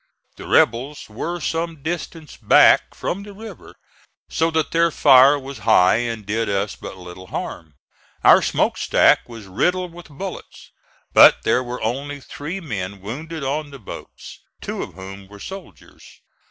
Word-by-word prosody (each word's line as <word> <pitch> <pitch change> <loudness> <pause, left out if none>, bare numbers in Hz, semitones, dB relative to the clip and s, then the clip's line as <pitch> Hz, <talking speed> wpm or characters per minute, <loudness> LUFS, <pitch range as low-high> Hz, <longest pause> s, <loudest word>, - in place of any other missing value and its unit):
The - - -10
rebels 125 +2 +1
were 170 +11 -4
some 165 -2 -3
distance 165 -1 -5
back - - +4
from 195 - -3
the 205 0 -11
river, 215 -2 -11 0.6
so 165 - +1
that 160 -2 -1
their 170 0 +3
fire 140 -2 +6
was 140 0 -9
high 110 -4 +4
and 115 -3 -4
did 110 +2 -1
us 100 0 -1
but - - -9
little 90 0 -11
harm. 80 -4 -7 0.5
Our - - +7
smoke - - 0
stack - - +3
was 115 -3 -10
riddled 180 - -1
with 175 0 -12
bullets, 180 +6 -9 0.4
but - - +7
there 125 - +2
were 125 -1 -6
only 140 +5 -3
three 150 +7 -7
men 100 - -5
wounded 150 - -7
on 145 +2 -2
the 140 - -10
boats, 110 - -11 0.2
two - - -5
of - - -8
whom 95 +1 -10
were 100 +1 -14
soldiers. 190 - -11
135 Hz, 155 wpm, -21 LUFS, 105-165 Hz, 0.6 s, Our